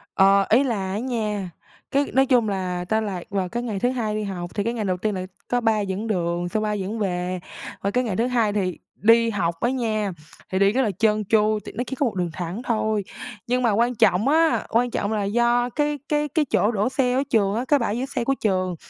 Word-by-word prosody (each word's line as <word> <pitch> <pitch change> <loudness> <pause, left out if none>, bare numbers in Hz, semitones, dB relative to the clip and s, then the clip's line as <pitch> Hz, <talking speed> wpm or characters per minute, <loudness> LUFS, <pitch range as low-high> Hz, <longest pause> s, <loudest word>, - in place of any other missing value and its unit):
Ờ, 195 0 +5
ý 250 +6 +5
là 200 -7 -2
á 200 - -2
nha, 215 -7 -2 0.4
cái 280 +1 +2
nói 270 +1 +4
chung 245 -5 +3
là 180 -2 -2
tao 220 0 +2
lạc 190 -5 -4
vào 190 -3 -1
cái 240 +1 -3
ngày 215 -5 -3
thứ 245 - +2
hai 225 -5 -2
đi 215 - -2
học 180 -3 -5
thì 205 - 0
cái 230 +2 -1
ngày 220 -3 -3
đầu 185 -1 0
tiên 210 +2 -1
là 185 0 -3 0.2
có 245 0 0
ba 225 -2 +2
dẫn 200 +2 -3
đường, 175 -3 -1
xong 215 +1 -1
ba 210 0 0
dẫn 210 +2 -3
về. 180 -2 -2 0.4
Qua 200 - -1
cái 250 +4 +1
ngày 215 -6 -2
thứ 230 +5 +1
hai 230 -5 +1
thì 185 -4 -1 0.2
đi 230 +2 +4
học 170 -6 -1
á 240 - +2
nha, 220 -6 -1 0.4
thì 185 - 0
đi 195 0 +5
rất 255 +5 +1
là 220 -5 +1
trơn 215 -1 +2
tru 215 -1 +3
tại - - -8
nó 245 - 0
chỉ 265 - -4
có 280 - +1
1 235 - -2
đường 180 -2 -1
thẳng 175 +5 -4
thôi. 220 -3 0 0.4
Nhưng 250 +1 +1
mà 235 - +3
quan 235 +4 +1
trọng 205 +2 +3
á, 320 +2 +3
quan 240 +2 +1
trọng 200 - -1
là 215 -2 0
do 240 +4 +2
cái 295 +1 -1
cái 300 0 +1
cái 300 +2 +1
chỗ 225 -4 +2
đỗ 210 +1 0
xe 260 -1 +1
ở 265 +2 +2
trường 205 -3 +2
á, 240 +3 -1
cái 290 +1 +4
bãi 230 -2 -1
giữ 255 - -1
xe 265 -3 -3
của 270 - +1
trường 185 -4 0
215 Hz, 255 wpm, -23 LUFS, 195-245 Hz, 0.4 s, Ờ